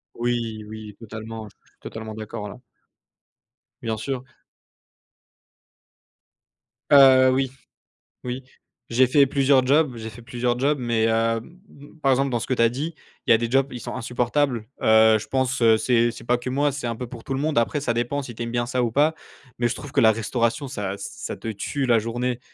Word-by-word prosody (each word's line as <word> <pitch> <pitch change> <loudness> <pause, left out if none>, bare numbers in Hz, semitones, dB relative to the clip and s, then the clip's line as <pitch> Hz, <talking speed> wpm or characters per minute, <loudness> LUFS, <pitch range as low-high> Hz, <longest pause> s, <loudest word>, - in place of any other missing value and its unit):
Oui, 115 -2 -2
oui, 110 -1 -9
totalement, 110 0 -8 0.3
totalement 110 0 -7
d'accord 110 -1 -6
là. 110 - -11 1.2
Bien 110 -1 -2
sûr. 130 +3 -4 2.7
Heu, 130 -2 +8
oui, 130 -1 0 0.7
oui, 125 +1 -4 0.4
j'ai 125 +2 +4
fait 140 +2 +5
plusieurs 135 -1 +3
jobs 145 0 +3
j'ai 110 - -6
fait 115 +2 -12
plusieurs 120 0 -1
jobs, 145 +3 +1
mais 115 -2 +1
heu, - - +2 0.3
m 170 +11 -14
m 145 +3 -16
par 135 -1 +4
exemple 135 +1 +1
dans 120 - 0
ceux - - -4
que 130 - 0
tu 115 - +1
as 115 - +5
dit, 150 +7 -4 0.3
il - - -1
y - - +9
a - - +4
des 115 0 -2
jobs, 135 +1 +2
ils 120 - -6
sont - - -6
insupportables. 125 +1 0 0.2
Heu, 110 0 +6
je - - -8
pense 130 -1 0 0.2
c'est 120 0 +2
c'est 115 - -11
pas 120 +1 +2
que 125 - -6
moi, 145 +2 +1
c'est 140 -2 -5
un 115 -1 -2
peu 125 - -5
pour 120 -1 -10
tout 135 - -3
le 135 - -2
monde. 155 -3 +1
Après 115 +5 +1
ça 130 -4 0
dépend 120 +5 -1
si 120 -3 -8
tu 120 - -6
aimes 115 - -4
bien 120 0 0
ça 125 0 0
ou 115 - 0
pas, 150 +6 +3 0.4
mais 120 0 +2
je 120 - -2
trouve 145 - -9
que - - +3
la 110 -1 +6
restauration 115 +5 -1
ça 100 -6 -4
ça - - -6
te - - -7
tue 110 +6 -3
la 120 -2 +4
journée. 120 +2 -2
120 Hz, 200 wpm, -23 LUFS, 115-135 Hz, 2.7 s, y